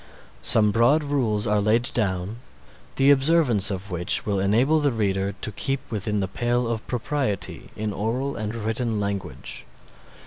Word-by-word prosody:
Some 105 Hz, -2 st, +4 dB
broad 120 Hz, +8 st, +3 dB
rules 120 Hz, -8 st, 0 dB
are 105 Hz, -1 st, +2 dB
laid 115 Hz, +4 st, +2 dB
down, 95 Hz, -1 st, -1 dB, 0.6 s
the 135 Hz, +1 st, +5 dB
observance 135 Hz, -, +4 dB
of 95 Hz, 0 st, -5 dB
which 90 Hz, 0 st, 0 dB
will 100 Hz, -2 st, 0 dB
enable 120 Hz, +11 st, +3 dB
the 145 Hz, -2 st, +2 dB
reader 100 Hz, -3 st, -1 dB
to -, -, -2 dB
keep 135 Hz, +6 st, -1 dB
within 105 Hz, -1 st, -1 dB
the 95 Hz, -, -1 dB
pale 120 Hz, +4 st, -1 dB
of 115 Hz, -1 st, -3 dB
propriety 125 Hz, -4 st, -3 dB
in 105 Hz, -1 st, -3 dB
oral 120 Hz, +8 st, -2 dB
and 110 Hz, +1 st, -4 dB
written 115 Hz, 0 st, -2 dB
language. 100 Hz, -9 st, -4 dB
110 Hz, 150 wpm, -24 LUFS, 100-125 Hz, 0.6 s, the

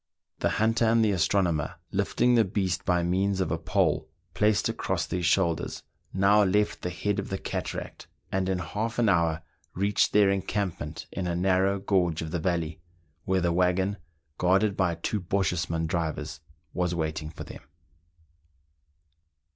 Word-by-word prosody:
The -, -, +1 dB
hunter 115 Hz, +2 st, +2 dB
and 115 Hz, 0 st, +4 dB
the 105 Hz, -, +2 dB
astronomer, 90 Hz, -4 st, +1 dB, 0.2 s
lifting 125 Hz, 0 st, +2 dB
the 115 Hz, -2 st, +5 dB
beast 95 Hz, -2 st, -1 dB
by 90 Hz, -1 st, +2 dB
means 95 Hz, +3 st, +1 dB
of 95 Hz, -, 0 dB
a 80 Hz, -, -1 dB
pole 80 Hz, -3 st, +1 dB, 0.2 s
placed 105 Hz, -1 st, +2 dB
across -, -, -2 dB
their 90 Hz, -, -3 dB
shoulders, 85 Hz, -1 st, +1 dB, 0.3 s
now 100 Hz, +2 st, +4 dB
left 105 Hz, +2 st, +1 dB
the 90 Hz, -, -2 dB
head 100 Hz, +3 st, -2 dB
of -, -, -5 dB
the 95 Hz, -, -2 dB
cataract, -, -, -5 dB, 0.2 s
and 95 Hz, 0 st, 0 dB
in 95 Hz, -, +1 dB
half 105 Hz, +7 st, -3 dB
an 115 Hz, -3 st, +3 dB
hour 85 Hz, -3 st, +2 dB, 0.3 s
reached 100 Hz, +2 st, +2 dB
their 100 Hz, -2 st, +5 dB
encampment 95 Hz, -5 st, -3 dB
in 95 Hz, -2 st, -3 dB
a 85 Hz, -, -1 dB
narrow 95 Hz, +2 st, +2 dB
gorge 90 Hz, -5 st, +1 dB
of 80 Hz, -, -6 dB
the 90 Hz, -, -1 dB
valley, 85 Hz, -1 st, -2 dB, 0.4 s
where 95 Hz, 0 st, +1 dB
the 85 Hz, 0 st, +1 dB
waggon, 90 Hz, +3 st, +1 dB, 0.4 s
guarded 95 Hz, +3 st, +3 dB
by 90 Hz, -3 st, +1 dB
two 95 Hz, +5 st, -2 dB
Bochjesman 85 Hz, -3 st, -1 dB
drivers, 80 Hz, -2 st, -3 dB, 0.3 s
was 90 Hz, -1 st, 0 dB
waiting 80 Hz, -2 st, -3 dB
for -, -, -8 dB
them. -, -, -10 dB
95 Hz, 155 wpm, -27 LUFS, 85-100 Hz, 0.4 s, the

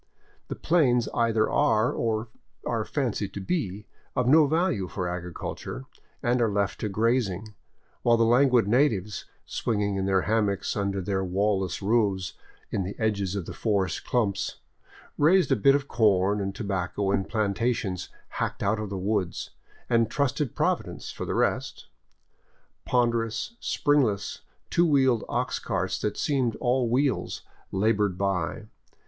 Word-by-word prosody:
The -, -, -4 dB
plains 130 Hz, -8 st, +2 dB
either 115 Hz, -2 st, +2 dB
are, 115 Hz, -5 st, +2 dB
or 110 Hz, 0 st, -1 dB, 0.4 s
are -, -, 0 dB
fancied -, -, -2 dB
to -, -, -3 dB
be, 105 Hz, -, -2 dB, 0.3 s
of 125 Hz, -1 st, +1 dB
no 150 Hz, +2 st, +6 dB
value 160 Hz, -, +1 dB
for 90 Hz, 0 st, -3 dB
agriculture, 90 Hz, +8 st, -5 dB, 0.4 s
and 120 Hz, 0 st, +2 dB
are 115 Hz, -, +3 dB
left 100 Hz, -1 st, -1 dB
to 105 Hz, -, -2 dB
grazing, 110 Hz, -1 st, 0 dB, 0.5 s
while 120 Hz, -1 st, +4 dB
the 115 Hz, -, +4 dB
languid 125 Hz, -2 st, +4 dB
natives, 110 Hz, -5 st, +1 dB, 0.2 s
swinging 105 Hz, -3 st, -1 dB
in 95 Hz, 0 st, -1 dB
their 95 Hz, -1 st, +3 dB
hammocks 105 Hz, -2 st, 0 dB
under 100 Hz, -1 st, -1 dB
their 95 Hz, +1 st, -1 dB
wall 95 Hz, +2 st, +1 dB
less 95 Hz, +1 st, -4 dB
roofs 100 Hz, -4 st, +1 dB, 0.4 s
in -, -, 0 dB
the 95 Hz, +2 st, -5 dB
edges 100 Hz, -4 st, 0 dB
of 95 Hz, -4 st, -3 dB
the -, -, -7 dB
forest 100 Hz, -6 st, -1 dB
clumps, 110 Hz, -6 st, 0 dB, 0.6 s
raised 175 Hz, +3 st, +4 dB
a -, -, +6 dB
bit 135 Hz, +5 st, +5 dB
of 140 Hz, -1 st, -1 dB
corn 100 Hz, -4 st, +2 dB
and 95 Hz, 0 st, -3 dB
tobacco 95 Hz, 0 st, -2 dB
in 100 Hz, -1 st, +1 dB
plantations 105 Hz, -3 st, -1 dB, 0.3 s
hacked -, -, -2 dB
out 105 Hz, +2 st, +1 dB
of 105 Hz, -2 st, -4 dB
the 100 Hz, -, -4 dB
woods, 95 Hz, -2 st, -2 dB, 0.4 s
and 115 Hz, -2 st, +2 dB
trusted 140 Hz, -1 st, -1 dB
Providence -, -, -1 dB
for -, -, -6 dB
the -, -, -1 dB
rest. -, -, -1 dB, 1.0 s
Ponderous, 115 Hz, -, 0 dB
springless, 135 Hz, -9 st, +1 dB, 0.3 s
two 175 Hz, 0 st, +4 dB
wheeled 130 Hz, -6 st, +3 dB
ox -, -, -1 dB
carts 95 Hz, 0 st, -2 dB
that 105 Hz, -1 st, -2 dB
seemed 130 Hz, -6 st, 0 dB
all 125 Hz, -1 st, +1 dB
wheels 135 Hz, +3 st, 0 dB, 0.3 s
labored 100 Hz, -1 st, +1 dB
by. 100 Hz, +1 st, -1 dB
110 Hz, 145 wpm, -27 LUFS, 100-125 Hz, 1.0 s, no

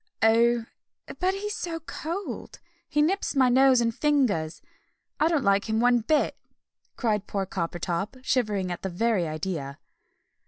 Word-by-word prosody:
"Oh, 230 Hz, +1 st, +4 dB, 0.5 s
but 375 Hz, +1 st, +1 dB
he's 415 Hz, +1 st, -4 dB
so 340 Hz, -7 st, -4 dB
cold! 335 Hz, +4 st, -6 dB, 0.3 s
He 295 Hz, 0 st, +2 dB
nips 375 Hz, 0 st, 0 dB
my 260 Hz, -2 st, +4 dB
nose 260 Hz, 0 st, +5 dB
and 230 Hz, -1 st, +1 dB
fingers. 235 Hz, -, +1 dB, 0.6 s
I 310 Hz, -, +4 dB
don't 320 Hz, -5 st, +1 dB
like 200 Hz, +2 st, +2 dB
him 220 Hz, 0 st, +1 dB
one 245 Hz, 0 st, +4 dB
bit!" 295 Hz, +7 st, +1 dB, 0.6 s
cried 210 Hz, -4 st, -1 dB
poor 195 Hz, -1 st, -2 dB
Coppertop, 175 Hz, -, -3 dB
shivering 210 Hz, -8 st, 0 dB
at 175 Hz, -, -5 dB
the 190 Hz, -, -3 dB
very 190 Hz, -1 st, +1 dB
idea. 155 Hz, -3 st, -4 dB
230 Hz, 145 wpm, -26 LUFS, 190-295 Hz, 0.6 s, nose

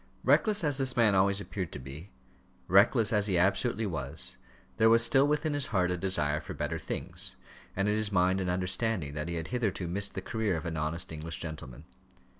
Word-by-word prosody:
Reckless 210 Hz, -4 st, +3 dB
as 145 Hz, -3 st, 0 dB
this 130 Hz, -1 st, 0 dB
man 110 Hz, -3 st, +4 dB
always 100 Hz, +1 st, +3 dB
appeared 95 Hz, -4 st, -5 dB
to -, -, -5 dB
be, 70 Hz, +7 st, -9 dB, 0.6 s
reckless 105 Hz, +5 st, +4 dB
as 105 Hz, -1 st, +2 dB
he 95 Hz, -3 st, +1 dB
absolutely 100 Hz, +5 st, +1 dB
was, 85 Hz, -7 st, -3 dB, 0.4 s
there 110 Hz, -, +5 dB
was 115 Hz, +1 st, +6 dB
still 135 Hz, +3 st, +4 dB
within 150 Hz, +1 st, 0 dB
his 145 Hz, -2 st, +2 dB
heart 90 Hz, -4 st, +1 dB
a -, -, 0 dB
desire 75 Hz, -5 st, 0 dB
for -, -, -8 dB
better 80 Hz, +2 st, -3 dB
things, -, -, -4 dB, 0.4 s
and 95 Hz, +2 st, 0 dB
in 105 Hz, -, +2 dB
his 105 Hz, -1 st, 0 dB
mind 95 Hz, 0 st, +2 dB
an 90 Hz, -, -2 dB
understanding 90 Hz, -2 st, -1 dB
that 75 Hz, +2 st, -4 dB
he 85 Hz, -, -3 dB
had 80 Hz, -1 st, -4 dB
hitherto 110 Hz, -7 st, -2 dB
missed 100 Hz, +3 st, -2 dB
the -, -, -2 dB
career 110 Hz, -5 st, -1 dB
of 80 Hz, -, -7 dB
an 85 Hz, -1 st, -3 dB
honest 80 Hz, +4 st, -3 dB
English 80 Hz, 0 st, -5 dB
gentleman. 75 Hz, -7 st, -8 dB
95 Hz, 205 wpm, -29 LUFS, 85-110 Hz, 0.6 s, was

